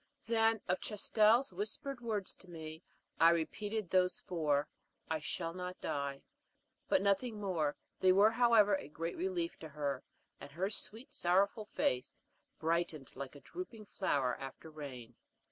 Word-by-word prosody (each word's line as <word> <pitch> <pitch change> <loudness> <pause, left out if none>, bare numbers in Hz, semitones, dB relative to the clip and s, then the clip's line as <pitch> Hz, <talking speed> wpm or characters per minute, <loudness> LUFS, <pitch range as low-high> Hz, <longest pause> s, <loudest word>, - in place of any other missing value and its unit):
Then, 225 -1 +3
of 180 0 +1
Chastel's 215 +3 +3
whispered 240 +7 -4
words 215 -5 -2
to 185 - -17
me, 160 -1 -7 0.4
I 165 - +8
repeated 205 +5 -1
those 180 -1 +3
four, 150 -4 +1 0.4
"I 160 - +1
shall 165 +2 -3
not 180 0 -5
die," 140 -1 -3 0.7
but 185 - +4
nothing 210 +3 +1
more; 170 -8 0 0.2
they 185 - +6
were 200 +4 +6
however, 225 -4 +5
a 190 - -1
great 165 +3 -4
relief 350 -1 -2
to 160 - -8
her, 140 -3 -2 0.4
and 140 - -10
her 190 +5 -1
sweet, 220 +4 -4
sorrowful 195 +4 +2
face 125 -10 -1 0.3
brightened 160 -4 -1
like 140 +1 -6
a 145 - -11
drooping 245 -13 -7
flower 140 -11 0
after 135 +4 -8
rain. 125 -6 -8
185 Hz, 145 wpm, -35 LUFS, 155-215 Hz, 0.7 s, I